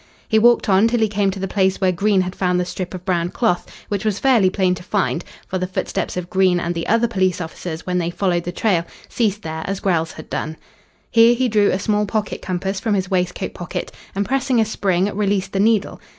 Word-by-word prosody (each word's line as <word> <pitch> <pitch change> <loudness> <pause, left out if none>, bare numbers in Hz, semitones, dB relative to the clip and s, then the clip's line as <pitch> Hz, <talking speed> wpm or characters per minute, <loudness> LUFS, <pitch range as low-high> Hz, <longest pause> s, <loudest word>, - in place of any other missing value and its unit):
He 220 - +3
walked 240 +2 +4
on 200 +2 +5
till 240 +1 +1
he 220 - +3
came 205 -1 +1
to 195 - -4
the 195 - -2
place 190 0 +1
where 185 -1 +3
Green 195 +2 +2
had 185 0 -4
found 180 -1 +1
the 180 - 0
strip 180 +1 -5
of 180 0 -9
brown 175 -2 0
cloth, 180 -4 0 0.2
which 200 -2 -2
was 215 -3 0
fairly 235 -8 +4
plain 185 -1 +1
to 180 - -6
find, 185 -2 -1 0.2
for 185 - -3
the 185 - -1
footsteps 185 - -3
of 180 -1 -3
Green 185 -1 +3
and 175 0 -2
the 170 -1 -4
other 230 +2 +3
police 185 -6 0
officers 165 -1 -6
when 180 -1 0
they 170 -1 -1
followed 175 -1 0
the 175 - -2
trail 180 -2 +1 0.3
ceased 210 -3 0
there 160 0 -4
as 195 0 -3
Grell's 165 -4 0
had 155 - -10
done. 155 +1 -4 0.5
Here 230 +1 +6
he 255 +1 +1
drew 210 -3 +3
a - - +1
small 210 +1 0
pocket 215 0 -2
compass 190 +2 -2
from 215 -1 0
his 190 -1 -2
waistcoat 180 -1 -1
pocket, 175 - -5 0.2
and 200 +1 0
pressing 265 0 +1
a 220 - +4
spring 190 -4 0
released 200 -2 0
the 195 - 0
needle. 215 0 +1
190 Hz, 235 wpm, -20 LUFS, 180-210 Hz, 0.5 s, Here